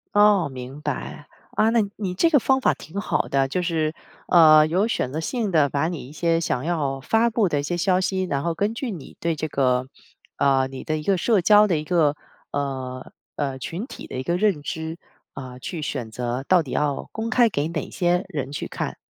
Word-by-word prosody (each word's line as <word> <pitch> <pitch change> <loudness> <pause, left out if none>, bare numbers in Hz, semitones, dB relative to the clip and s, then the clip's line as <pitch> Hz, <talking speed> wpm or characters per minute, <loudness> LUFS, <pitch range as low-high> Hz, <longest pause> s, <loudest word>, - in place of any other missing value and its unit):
哦， 205 -6 +5
明 130 +2 -8
白。 - - -5 0.3
啊， 220 - +4
那 230 - +3 0.2
你 195 -4 -3
这 330 - +3
个 295 -4 +5
方 265 +2 +2
法 - - +3
挺 190 +6 -7
好 - - -1
的， 135 -1 +1
就 180 +7 -1
是， 160 -3 0 0.3
呃， 155 -3 +7
有 185 +7 +1
选 130 - -1
择 155 - -3
性 220 +4 -2
地 150 -5 +4
把 145 +4 0
你 165 -7 -6
一 - - -12
些 165 +1 +1
想 150 -5 -1
要 145 -6 -1
发 225 - +2
布 220 -3 +2
的 145 -3 0
一 - - -3
些 175 +4 -2
消 185 +1 +2
息， 185 +1 0
然 140 -6 -2
后 170 - 0
根 205 +6 0
据 250 +2 -4
你 170 -8 -9
对 165 -1 0
这 155 +1 -3
个， 130 -2 +1 0.5
呃， 135 -1 +3
你 135 - -8
的 155 0 -1
一 150 - -6
个 195 +3 +2
社 215 +3 +2
交 210 +3 +6
的 175 -5 +1
一 150 - -3
个， 155 -3 +2 0.4
呃 130 -2 -4 0.2
呃， 135 -2 -3
群 180 - -5
体 - - -10
的 - - -6
一 130 - -3
个 170 +4 0
认 195 -7 +1
知， 160 +2 -5 0.4
啊， 130 -1 -8
去 165 +4 -5
选 125 -6 -4
择 125 +3 -3
到 180 -3 +4
底 135 - -9
要 145 -2 -1
公 225 +1 -4
开 240 -1 +4
给 145 -4 -1
哪 165 -2 -4
些 175 0 +1
人 140 -6 -4
去 145 - -4
看。 - - -4
160 Hz, 240 characters per minute, -23 LUFS, 140-190 Hz, 0.5 s, 呃